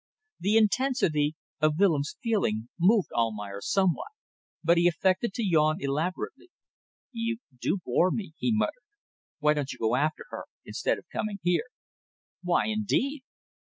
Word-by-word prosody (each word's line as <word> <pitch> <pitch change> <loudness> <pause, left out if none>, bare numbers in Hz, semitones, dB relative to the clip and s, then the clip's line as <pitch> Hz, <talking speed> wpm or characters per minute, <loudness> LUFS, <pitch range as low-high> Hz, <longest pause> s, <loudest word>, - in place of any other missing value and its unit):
The 205 +4 +3
intensity 210 - +2 0.2
of 155 -1 +2
Willems' 160 -7 +2
feeling 120 - 0
moved 200 +3 +4
Almayer 105 -3 -2
somewhat, 190 - +1 0.6
but 170 +1 +4
he 175 - +5
affected 185 +6 +1
to 235 - -1
yawn 155 -3 +3
elaborately, 175 - -3 0.6
"You 230 -1 -2 0.2
do 125 +10 0
bore 180 - +3
me," 190 -5 -4
he 245 - +1
muttered. 220 - 0 0.6
"Why 150 0 +3
don't 145 -2 -2
you - - -8
go 115 +2 +1
after 155 +4 0
her - - -6 0.2
instead - - -1
of - - -13
coming 210 -2 -2
here?" 175 +5 +2 0.8
"Why 180 -1 +2
indeed?" 220 +6 0
175 Hz, 140 wpm, -28 LUFS, 150-215 Hz, 0.8 s, he